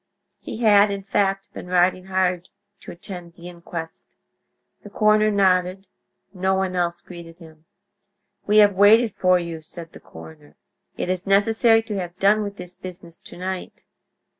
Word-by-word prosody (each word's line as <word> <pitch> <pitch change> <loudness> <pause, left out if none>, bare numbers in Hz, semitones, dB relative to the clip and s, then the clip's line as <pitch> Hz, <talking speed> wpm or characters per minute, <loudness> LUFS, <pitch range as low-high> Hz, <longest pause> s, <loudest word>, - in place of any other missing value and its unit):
He - - -8
had, 205 -1 +5
in 200 -1 -5
fact, 195 0 -1
been - - -9
riding 180 +1 +1
hard 185 -2 -1 0.3
to - - -11
attend 175 -1 -10
the 170 0 -12
inquest. 170 -2 -9 0.7
The 205 - -12
coroner 215 +1 +3
nodded; 190 -1 +1 0.5
no 190 +1 0
one 190 -1 -2
else 175 -1 -1
greeted 170 -2 -12
him. 160 -2 -17 0.8
"We 210 +1 +3
have 205 -1 +6
waited 210 +3 +5
for 185 0 +3
you," 170 -2 -6
said 165 +1 -10
the - - -13
coroner. 150 -2 -14 0.4
"It - - -3
is 185 +1 -4
necessary 225 +3 +3
to 210 -3 -4
have 175 -1 -7
done 205 +3 +3
with 200 -1 -6
this 180 0 -10
business 175 -2 -11
to - - -12
night." 185 +1 -6
185 Hz, 160 wpm, -22 LUFS, 175-200 Hz, 0.8 s, have